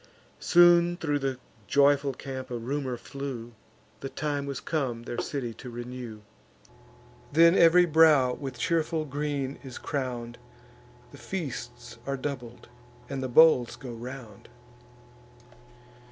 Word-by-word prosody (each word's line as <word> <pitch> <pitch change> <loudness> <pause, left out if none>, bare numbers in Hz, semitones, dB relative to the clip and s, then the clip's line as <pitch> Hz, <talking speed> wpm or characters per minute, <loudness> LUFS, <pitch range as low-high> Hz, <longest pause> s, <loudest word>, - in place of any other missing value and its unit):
Soon 175 0 +5
thro' 145 -4 -1
the 135 -2 -2 0.3
joyful 140 0 +3
camp 130 -1 -7
a 120 - -3
rumour 130 +1 -3
flew, 130 -3 -7 0.5
The 135 - -6
time 145 -1 -3
was 140 -1 -4
come 130 -7 -2
their 120 - -5
city 125 -5 -3
to 125 - -10
renew. 120 -2 -7 1.1
Then 165 +3 +6
ev'ry 175 +1 +6
brow 155 -6 +5
with 135 -2 -6
cheerful 160 +3 0
green 145 -1 -3
is 130 -2 -8
crown'd, 125 -4 -4 0.7
The 140 - -13
feasts 120 -5 -6
are 135 0 -1
doubled, 130 -4 -6 0.4
and 135 -1 -4
the 130 - -3
bowls 125 -3 +5
go 125 - -9
round. 120 -2 -9
135 Hz, 125 wpm, -27 LUFS, 120-150 Hz, 1.1 s, Then